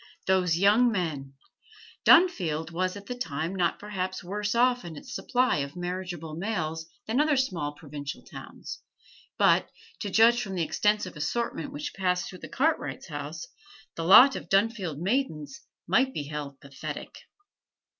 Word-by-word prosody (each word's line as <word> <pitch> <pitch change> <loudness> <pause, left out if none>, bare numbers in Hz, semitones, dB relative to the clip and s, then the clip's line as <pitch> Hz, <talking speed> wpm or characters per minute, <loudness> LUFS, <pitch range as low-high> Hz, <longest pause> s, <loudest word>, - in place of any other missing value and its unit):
Those 180 -3 +2
young 215 +6 +5
men! 150 -9 -3 0.7
Dunfield 170 - +4
was 185 +2 -1
at 200 - -11
that 245 +2 -6
time 160 0 -2
not 175 -3 +1
perhaps 185 -3 -4
worse 205 +4 -2
off 245 +1 +3
in 170 -2 -8
its - - -9
supply 255 - +1
of 140 +2 -4
marriageable 175 -3 -5
males 160 -3 -3 0.2
than 235 +6 +1
other 300 -2 +2
small 175 - -1
provincial 145 -1 -7
towns, - - -9 0.6
but, - - +4 0.3
to 205 - -3
judge 230 +4 +5
from 195 -5 -5
the 175 - 0
extensive 210 +1 0
assortment 235 - -2
which 290 +1 -5
passed 180 -2 0
through 185 - -10
the - - -9
Cartwrights' 310 +4 -1
house, - - -6 0.5
the 165 - -3
lot 245 +10 +8
of - - -7
Dunfield 195 -6 +1
maidens 205 - -2 0.3
might 260 +2 +2
beheld 145 -1 -5
pathetic. 140 -2 -7
185 Hz, 145 wpm, -27 LUFS, 160-235 Hz, 0.7 s, lot